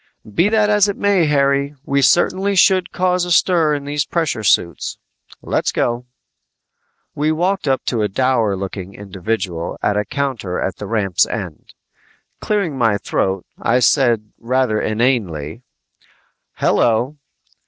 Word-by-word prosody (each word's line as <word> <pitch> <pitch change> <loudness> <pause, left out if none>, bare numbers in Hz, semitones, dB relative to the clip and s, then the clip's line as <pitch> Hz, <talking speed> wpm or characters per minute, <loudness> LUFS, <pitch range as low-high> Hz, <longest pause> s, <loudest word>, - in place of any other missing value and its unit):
"Be 175 - +3
that 215 -1 +3
as 210 -1 +4
it 200 - -3
may, 200 -5 +2
Harry, 140 0 +1
we 140 0 +1
certainly 190 +7 +2
should 185 0 +3
cause 180 0 +1
a 175 - -3
stir 165 -3 +3
in 140 -1 -6
these 145 0 -1
pressure 160 -10 -2
suits. 85 -5 +1 0.5
Let's - - 0
go!" 120 +1 -1 1.1
We 150 +2 0
walked 180 +2 -1
up 135 -1 0
to 115 -3 -1
a 105 - +1
dour 115 -1 +1
looking 95 0 -6
individual 95 -3 -4
at 105 - +1
a 105 - +1
counter 130 -10 -3
at 95 - -3
the 105 - -7
ramp's 100 -5 +1
end. - - -7 0.6
Clearing 185 -10 -1
my 115 -4 +2
throat, 95 -1 -2 0.2
I 115 - +2
said 120 -4 +2
rather 125 -2 0
inanely, 110 - -1 0.9
"Hello!" 120 +6 +1
130 Hz, 140 wpm, -18 LUFS, 105-160 Hz, 1.1 s, as